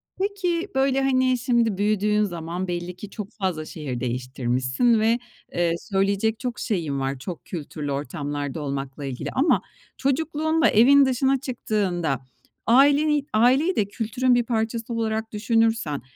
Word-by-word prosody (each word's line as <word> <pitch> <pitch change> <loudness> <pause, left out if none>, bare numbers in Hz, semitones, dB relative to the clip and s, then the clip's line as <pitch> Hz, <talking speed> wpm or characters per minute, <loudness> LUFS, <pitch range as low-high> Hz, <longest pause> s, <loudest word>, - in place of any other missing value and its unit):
Peki, 380 -2 -1
böyle, 270 0 +2
hani, 260 -1 +2
şimdi 235 -4 +1
büyüdüğün 210 0 +2
zaman 175 0 -4
belli 175 0 -4
ki 200 +2 -9
çok 210 +1 -7
fazla 185 -7 -3
şehir 135 -7 -5
değiştirmişsin 130 - 0
ve, 230 +2 +2 0.3
eee, 170 -1 +1
söyleyecek 200 +2 0
çok 250 -2 -4
şeyin 160 - -2
var. 135 0 -2
Çok 170 +4 -7
kültürlü 150 -3 -5
ortamlarda 145 +2 -4
olmakla 140 0 -4
ilgili 130 -2 -4
ama 290 +6 +2 0.4
çocukluğunda 315 +3 +1
evin 275 +6 +6
dışına 265 +1 +2
çıktığında 185 - -2 0.4
aileni 285 +3 +4
aileyi 260 +11 +4
de 210 - +2
kültürün 230 +5 0
bir 240 - +2
parçası 230 0 -2
olarak 220 -1 -2
düşünürsen 225 - +1
215 Hz, 135 wpm, -24 LUFS, 160-255 Hz, 0.4 s, evin